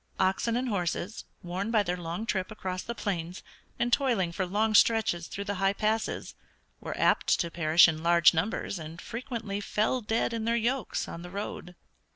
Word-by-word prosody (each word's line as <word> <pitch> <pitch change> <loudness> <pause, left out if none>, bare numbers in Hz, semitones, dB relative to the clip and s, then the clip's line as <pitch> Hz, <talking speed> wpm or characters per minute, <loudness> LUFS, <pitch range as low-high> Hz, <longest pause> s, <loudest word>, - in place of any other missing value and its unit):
Oxen 195 +5 +1
and 255 +1 -1
horses, 190 0 -2 0.2
worn 185 +4 -3
by 220 -3 +3
their 180 -2 -1
long 175 +4 -4
trip 190 -4 -1
across 185 -4 -4
the 235 - -5
plains, 180 -5 -4 0.3
and 240 0 0
toiling 230 -11 +2
for 185 +2 -2
long 215 +4 +1
stretches 210 -6 +3
through 200 - -5
the 200 0 -2
high 195 0 +3
passes, 215 +2 -1 0.5
were - - -6
apt - - +2
to 170 - -1
perish 165 0 +6
in 160 -1 -2
large 170 0 +5
numbers 180 +2 -2
and 160 +1 -8
frequently 230 -3 -5
fell 215 +5 0
dead 225 +1 0
in 225 -1 -2
their 230 +1 +2
yokes 235 0 -1
on 170 - -7
the 175 - -8
road. 180 -2 -6
200 Hz, 185 wpm, -29 LUFS, 175-225 Hz, 0.5 s, perish